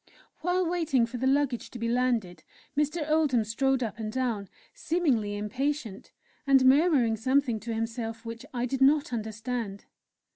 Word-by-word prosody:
While 360 +2 +1
waiting 320 -8 +1
for 240 +2 -6
the 260 +2 0
luggage 270 -3 +1
to - - -9
be 230 0 -2
landed, 235 -7 0 0.3
Mr. 300 +2 0
Oldham 305 -7 +2
strode 260 +4 0
up 225 0 -5
and 215 -1 -3
down, 230 -6 -2 0.2
seemingly 255 -12 0
impatient, 250 +1 -3 0.4
and 270 -1 +5
murmuring 270 -4 +4
something 255 0 +1
to 230 +2 -5
himself 225 0 -4
which 230 +1 -7
I 245 -1 -1
did 270 +2 -3
not 280 -1 +4
understand. 220 -1 -4
250 Hz, 150 wpm, -28 LUFS, 225-280 Hz, 0.4 s, and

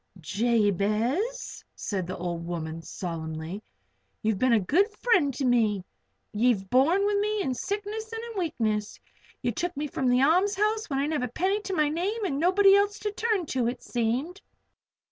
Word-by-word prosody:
"Jabez," 220 - 0
said 190 -4 -3
the 185 - -4
little 175 0 -4
old 170 0 -5
woman, 165 -1 -4
solemnly, 165 +1 -5 0.6
"you've 215 -3 +1
been 255 -2 +3
a 225 - +5
good 330 - +3
friend 385 - +3
to 275 - -2
me 220 -6 +2 0.5
ye've 210 -4 +1
borne 325 +10 +4
with 410 0 +2
me 420 0 0
in 260 - -1
sickness 415 - -4
and 450 0 -5
in 420 - -4
weakness. 215 - -1 0.4
Ye 245 - +1
took 345 +7 -3
me 295 - -1
from 270 -2 -2
the 250 +1 +4
a'mshouse 405 +7 +2
when 275 - -1
I 275 - +1
didn't 300 -1 -1
have 250 - -2
a - - -26
penny 390 +4 0
to 390 -2 -4
my 305 -3 +2
name 395 +8 -1
and 280 -7 -1
nobody 390 +4 +5
else 405 +1 +2
to 425 -2 -3
turn 425 -4 0
to, 250 -3 +1
it 240 - -4
seemed. 255 - -2
275 Hz, 185 wpm, -27 LUFS, -, 0.6 s, a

